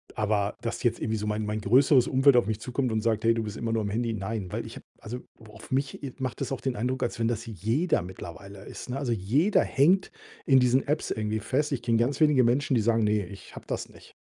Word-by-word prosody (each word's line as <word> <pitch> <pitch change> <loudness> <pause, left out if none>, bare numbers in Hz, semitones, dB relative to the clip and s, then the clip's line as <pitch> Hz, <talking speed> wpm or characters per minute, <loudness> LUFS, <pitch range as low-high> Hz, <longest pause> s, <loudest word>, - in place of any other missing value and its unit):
aber, 105 -1 0
dass - - -4
jetzt - - +1
irgendwie 110 0 -1
so 105 0 -4
mein 105 0 -1
mein 105 +1 -3
größeres 130 +4 +4
Umfeld 135 -1 +5
auf 120 - +4
mich 110 -1 -2
zukommt 125 +1 -2
und 110 0 0
sagt: 110 -1 0
„Hey, 115 - +5
du 115 - -1
bist 105 -1 -6
immer 115 - -2
nur 115 - +1
am 100 - -2
Handy.“ 115 +2 -1
Nein, 100 -2 -4
weil - - -3
ich - - -9
habe, - - -13
also 120 +3 -6 0.2
wo 110 -1 -15
auf - - -13
mich, 135 +2 -2
äh, 135 -3 -5
macht 130 -5 -4
das - - -2
auch 135 - -3
den 130 -2 -2
Eindruck, 125 +5 -2
als - - -3
wenn 115 - +1
das 115 -1 -2
jeder 115 - 0
mittlerweile 95 +2 -10
ist, - - -9
ne? 125 - -2
Also 135 -4 -2
jeder 125 - +2
hängt 180 +8 +3 0.3
in 135 -2 +6
diesen 125 +2 +2
Apps 150 +2 -1
irgendwie 110 0 -1
fest. 145 +7 0
Ich 130 -4 -2
kenne 115 -1 +2
ganz 120 +6 0
wenige 150 -4 +5
Menschen, 130 +3 +2
die 115 - +3
sagen: 115 +1 +2
„Ne, 105 -1 +1
ich 100 +2 -12
habe - - -10
das - - -4
nicht.“ - - -17
115 Hz, 260 wpm, -27 LUFS, 105-130 Hz, 0.3 s, in